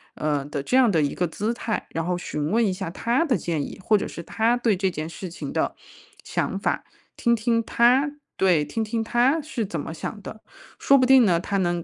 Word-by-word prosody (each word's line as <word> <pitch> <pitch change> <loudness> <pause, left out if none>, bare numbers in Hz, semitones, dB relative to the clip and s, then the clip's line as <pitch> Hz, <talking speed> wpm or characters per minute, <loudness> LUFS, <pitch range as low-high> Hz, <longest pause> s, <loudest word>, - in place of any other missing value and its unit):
呃， 150 -2 -1
的 145 -1 -4
这 250 - 0
样 255 -3 +5
的 165 -4 +2
一 140 - -1
个 180 - -1
姿 210 +7 -2
态。 230 -2 -3
然 165 0 -2
后 180 0 -1
询 150 -3 -3
问 230 +1 +3
一 200 - +1
下 185 -2 -5
他 235 - 0
的 265 -6 +2
建 165 -2 -2
议， - - -6
或 215 - +4
者 - - -3
是 170 - -8
他 220 +5 +1
对 235 -4 +2
这 190 +1 +1
件 155 -3 -5
事 180 +2 -7
情 170 - -7
的 - - -1 0.5
想 - - -2
法， - - -1 0.3
听 235 0 +2
听 230 +1 +1
他 250 +6 +3 0.3
对， 180 -6 +3
听 225 - -3
听 225 +1 -2
他 245 +7 +2
是 280 -7 -3
怎 175 - -5
么 160 - -5
想 205 +6 -6
的。 215 +2 -9 0.4
说 275 - +5
不 255 - +4
定 260 -2 +6
呢， 175 -4 +3
他 200 +3 -2
能 175 -2 0
205 Hz, 250 characters per minute, -24 LUFS, 170-235 Hz, 0.5 s, 定